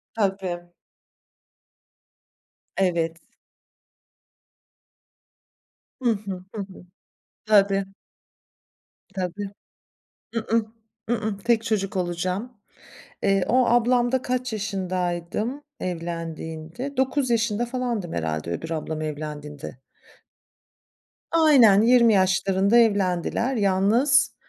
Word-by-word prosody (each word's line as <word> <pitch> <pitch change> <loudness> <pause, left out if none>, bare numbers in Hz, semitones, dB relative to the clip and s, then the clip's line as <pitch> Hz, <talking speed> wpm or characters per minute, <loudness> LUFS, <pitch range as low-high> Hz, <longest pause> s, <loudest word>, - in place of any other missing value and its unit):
Tabii. 190 -4 -2 2.1
Evet. 170 -3 +1 2.8
Hı 245 - +2
hı, 200 -4 -3
hı 210 - -3
hı. 190 -2 -10 0.6
Tabii. 200 -2 +4 1.3
Tabii. 190 +2 -3 0.8
I-ıh, 230 0 +1 0.5
ı-ıh, 220 -4 -1
tek 230 +1 +2
çocuk 210 -3 -1
olacağım. 185 +6 -2 0.7
Eee, 195 -2 +2
o 255 +1 +4
ablamda 240 +1 +3
kaç 250 -1 -2
yaşındaydım 190 - -2 0.2
evlendiğinde? 165 - -5
9 265 0 +1
yaşında 230 -1 +1
falandım 240 -7 -3
herhâlde 80 0 -2
öbür 160 - -4
ablam 160 -1 -3
evlendiğinde. 150 -3 -6 1.5
Aynen, 270 -11 +6
20 235 -1 +5
yaşlarında 195 +2 +3
evlendiler, 205 +3 +2
yalnız, 220 +7 +3
200 Hz, 75 wpm, -24 LUFS, 175-235 Hz, 2.8 s, Aynen